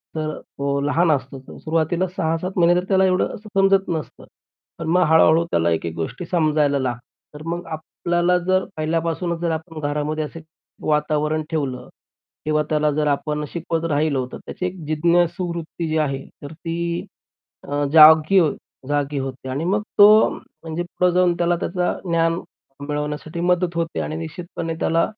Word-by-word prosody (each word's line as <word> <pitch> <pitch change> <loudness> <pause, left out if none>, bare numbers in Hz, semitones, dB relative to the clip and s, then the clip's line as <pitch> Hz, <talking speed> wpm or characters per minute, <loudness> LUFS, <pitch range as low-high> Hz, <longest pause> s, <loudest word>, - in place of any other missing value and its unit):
तर 155 -1 -3
तो 140 0 -3
लहान 160 +4 +2
असतो. 135 -1 -2
तर 130 - -13
सुरुवातीला 165 +3 0
6-7 165 +3 -1
महिने 175 +1 +4
तर 180 - -5
त्याला 190 -1 +3
असं 185 - +4
एवढं 185 - 0
असं 215 +1 -12
समजत 195 -1 +3
नसतं. 160 -2 -5 0.5
पण 165 - -4
मग 180 - +4
हळू-हळू 160 +1 +5
त्याला 85 +1 +2
एक 80 - -1
एक 85 - -3
गोष्टी 85 - -4
समजायला 150 -4 +2
लागतात. 125 -2 -2 0.3
तर 150 - -10
मग 175 +1 -3
आपल्याला 175 +2 0
जर 185 0 +3
पहिल्यापासूनच 165 +2 -1
जर 170 -1 -1
आपण 160 0 -5
घरामध्ये 150 +1 -2
असे 160 +2 -7 0.5
वातावरण 150 +1 +1
ठेवलं 140 -5 -3 0.6
किंवा 155 0 +2
त्याला 150 -1 +2
जर 150 +1 0
आपण 150 +1 -1
शिकवत 165 -1 -2
राहिलो 145 -3 +1
तर - - -6
त्याची 180 - -5
एक 180 +1 -3
जिज्ञासूवूत्ती 170 +1 0
जी 155 0 0
आहे 135 -3 -1 0.2
तर 145 - -7
ती 170 +1 -3 0.7
अ, 145 0 0
जागी 155 +3 +8
हो 160 -5 +4 0.4
जागी 145 0 0
होते. 130 -1 -5
आणि 140 +5 -2
मग 200 +3 +1 0.2
तो 210 +1 +8
म्हणजे 165 +1 -7
पुढे 180 +1 0
जाऊन 180 0 +3
त्याला 175 0 +1
त्याचा 180 0 -1
ज्ञान 165 -1 +1 0.5
मिळवण्यासाठी 150 +3 -3
मदत 180 0 +1
होते 165 -1 -2
आणि 155 - -3
निश्चितपणे 165 0 -5
त्याला 165 +1 +2
160 Hz, 165 wpm, -22 LUFS, 150-175 Hz, 0.7 s, जागी